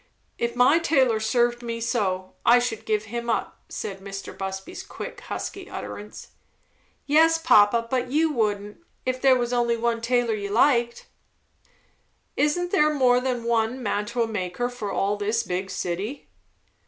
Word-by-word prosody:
"If 235 0 -1
my 250 +7 +5
tailor 265 -9 +2
served 240 +2 +1
me 230 -1 -4
so, 190 -6 -1
I 240 - +6
should 240 -3 -2
give 215 -1 +1
him 235 +2 -5
up," 225 - -2
said 195 -1 -5
Mr. 195 0 -8
Busby's 190 0 -6
quick, - - -8
husky 390 -1 -6
utterance. 210 +1 -8 0.8
"Yes, 325 +3 +5
papa, 230 -7 +4
but 250 0 -1
you 310 +3 +2
wouldn't, 210 -3 -1 0.3
if 255 0 -2
there 270 -1 +6
was 240 -1 -1
only 235 -1 +1
one 230 0 -1
tailor 240 -1 +1
you 200 -2 -4
liked." 235 +1 +2 1.3
"Isn't 355 +4 +1
there 305 -6 +4
more 255 -4 +3
than 250 -2 -2
one 235 +2 0
mantua 215 +3 -1
maker 215 +2 -3
for 225 -5 -5
all 200 +2 0
this 215 +3 0
big 185 +2 -3
city?" 195 +8 -4
235 Hz, 150 wpm, -25 LUFS, 210-255 Hz, 1.3 s, I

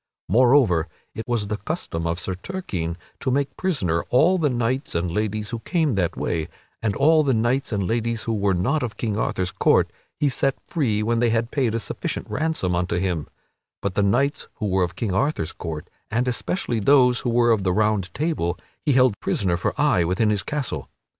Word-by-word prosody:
Moreover, 115 - +4 0.3
it 110 - -6
was 120 -4 0
the 105 +1 -3
custom 85 - -3
of 85 +1 -1
Sir 95 - -3
Turquine 90 - -4 0.2
to - - -1
make 140 +2 0
prisoner 115 - 0
all 170 +9 +4
the 150 -3 +2
knights 125 0 -1
and 85 +1 0
ladies 105 +3 -2
who 115 - -3
came 155 - 0
that 90 -4 0
way; 80 -2 -1 0.3
and 105 -3 0
all 155 +3 +5
the 135 -4 +2
knights 120 +5 +1
and 100 -3 0
ladies 115 +1 -1
who 115 - -1
were 100 -3 +1
not 135 - +1
of 120 -3 -4
King 110 -4 -1
Arthur's 95 -4 -1
court - - +3 0.3
he 145 - +3
set 135 0 +1
free 115 -11 0
when 115 +1 +1
they 120 0 +3
had 115 +1 0
paid 125 -6 +1
a - - +1
sufficient - - -4
ransom 155 - 0
unto 85 0 0
him; 90 -4 -1 0.5
but 100 -2 -2
the 100 - +1
knights 125 +9 +1
who 110 - -4
were 95 -1 +1
of 85 -1 -3
King 100 -1 -2
Arthur's 135 - 0
court, 80 -3 -6 0.2
and 120 +3 0
especially 125 - -1
those 125 +2 +5
who 125 - -2
were 120 0 +4
of 110 -3 +3
the 95 -1 +1
Round 105 -2 +1
Table, 140 - -1 0.3
he 145 - +2
held 125 -5 +4
prisoner 95 -4 0
for 85 - -2
aye 90 - +3
within 95 +6 +1
his 105 -2 +1
castle. 150 -3 -4
115 Hz, 200 wpm, -23 LUFS, 95-130 Hz, 0.5 s, all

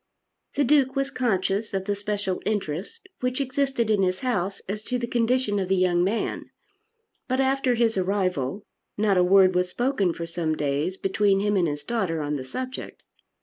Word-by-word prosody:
The 285 - +3
Duke 270 -1 +3
was 275 0 0
conscious 205 -4 0
of 190 0 -2
the 205 - 0
special 205 -2 -2
interest 205 - -3
which 250 +1 -1
existed 265 -4 0
in 205 -2 +3
his 185 0 0
house 200 -6 -1
as 205 +2 -5
to 250 - -1
the 240 - -2
condition 235 -3 +1
of 190 - -1
the 190 - +3
young 180 -1 +3
man, 205 +5 -2 0.8
but, 260 0 0
after 265 -1 +2
his 225 -3 +2
arrival, 185 -3 -1 0.3
not 205 -1 +2
a - - +5
word 185 0 +6
was 180 0 +1
spoken 240 -4 +1
for 170 0 -5
some 165 -1 -2
days 150 +5 -1
between 195 0 +2
him 205 +1 +1
and 180 -3 +3
his 145 -1 -4
daughter 195 -9 -1
on 150 0 -2
the 135 - -4
subject. 255 - -6
200 Hz, 185 wpm, -25 LUFS, 180-245 Hz, 0.8 s, word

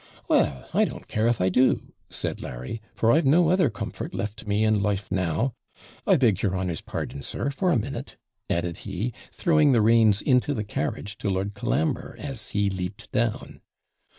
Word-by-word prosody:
'Well, 65 -2 +2
I - - +4
don't - - -7
care 110 +1 +1
if 120 -1 +2
I 90 - +3
do,' 125 +7 +2 0.2
said - - -3
Larry; 65 - -6
'for 115 - +2
I've 160 0 +4
no 165 +4 +5
other 185 0 +4
comfort - - -6
left 105 +1 -4
me 105 +1 +2
in 110 -2 +3
life 100 -1 -1
now. 95 +7 0 0.5
I - - +6
beg 110 -8 +3
your 95 -2 0
honour's 90 -4 -2
pardon, 70 - -5
sir, 140 - -3
for 180 +6 +1
a 155 - +4
minute,' 110 - -5 0.3
added 85 0 -1
he, 105 +4 -4 0.2
throwing 150 -4 +3
the 115 - +4
reins 110 -2 +5
into 130 +4 +2
the 105 - -2
carriage 105 0 -4
to 100 - -1
Lord 95 +1 -1
Colambre, 80 +2 -1
as 135 -6 -5
he 100 -1 +1
leaped 100 +3 -5
down. 115 0 -1
105 Hz, 180 wpm, -26 LUFS, 95-125 Hz, 0.5 s, I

